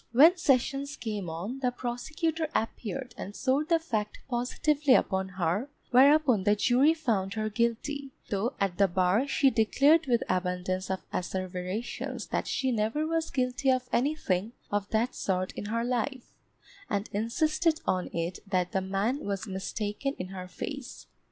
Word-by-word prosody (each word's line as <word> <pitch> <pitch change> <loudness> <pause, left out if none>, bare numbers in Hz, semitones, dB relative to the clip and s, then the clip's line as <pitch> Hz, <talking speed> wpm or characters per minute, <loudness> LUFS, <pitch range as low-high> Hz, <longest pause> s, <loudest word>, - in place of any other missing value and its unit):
When 315 +9 +8
sessions 280 -3 +1
came 210 -6 -4
on, 190 +11 -5
the 255 -2 +1
prosecutor 310 +7 -2
appeared 245 +3 -3
and 205 - -6
swore 270 +3 +1
the 335 +1 +3
fact 220 -10 -3
positively 270 +3 +2
upon 190 -1 +1
her, 190 - 0 0.2
whereupon 265 -4 +5
the 205 +1 +4
jury 255 +9 +4
found 215 -11 -1
her 215 0 -1
guilty, 235 +6 -1 0.2
though 215 +6 0
at 195 -2 -1
the 200 - +6
bar 185 +8 +2
she 275 0 +3
declared 275 +8 +4
with 235 -2 +2
abundance 185 0 -1
of 190 0 -2
asseverations 185 +4 -4
that - - -1
she 260 -1 0
never 225 +7 0
was 325 0 -1
guilty 255 0 0
of 255 -1 +2
anything 235 -7 0 0.2
of 205 0 -1
that 225 +3 +1
sort 185 -1 -1
in - - -6
her 230 +2 -1
life, 250 +1 -2 0.6
and 205 0 -1
insisted 310 - +1
on 185 -1 0
it 170 +2 -3
that 180 -2 0
the 190 - 0
man 200 +9 -1
was 200 +1 -3
mistaken 210 +6 -3
in 185 - -5
her 185 -1 -7
face. 260 +8 -7
230 Hz, 155 wpm, -29 LUFS, 195-275 Hz, 0.6 s, When